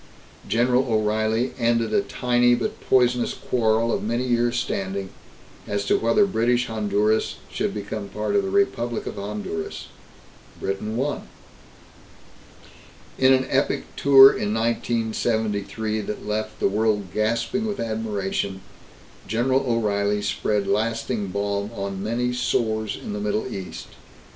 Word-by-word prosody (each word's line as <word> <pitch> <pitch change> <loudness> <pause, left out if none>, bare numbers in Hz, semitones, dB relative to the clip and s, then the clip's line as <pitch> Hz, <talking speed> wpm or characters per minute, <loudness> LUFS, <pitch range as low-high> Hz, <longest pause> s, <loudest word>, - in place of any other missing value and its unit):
General 125 +3 +2
O'Reilly 110 +3 +1
ended 115 -1 +1
a 205 - +4
tiny 120 -7 +2
but 120 - -4
poisonous 125 -1 +2
quarrel 115 -1 +1
of - - -1
many 120 +4 -1
years' 120 0 +1
standing 95 -4 -3 0.6
as 100 0 -2
to - - +3
whether 115 - +4
British 120 - +1
Honduras 105 0 0 0.2
should - - -1
become 105 0 -5
a - - -9
part 105 - -2
of 200 - +4
the 195 - -3
Republic 120 - 0
of - - -6
Honduras. 100 -5 -5 0.7
Britain 100 +3 -3
won. 140 +3 -2 1.9
In 130 0 +5
an 130 0 +4
epic 135 +1 -1
tour 135 -1 +9
in 105 -3 -1
1973 110 -2 -1
that 105 0 -6
left 110 +1 -3
the - - +3
world 105 -2 0
gasping 115 - 0
with 210 - -3
admiration, 105 -4 -2 0.7
General 125 +5 +2
O'Reilly 105 -3 +1
spread 105 0 0
lasting 115 0 -1
balm 100 +1 -2
on 100 -1 -4
many 120 +4 -1
sores 110 -3 0
in 105 - -6
the 105 - -4
Middle 105 +1 -1
East. 95 -2 -7
110 Hz, 130 wpm, -24 LUFS, 105-120 Hz, 1.9 s, tour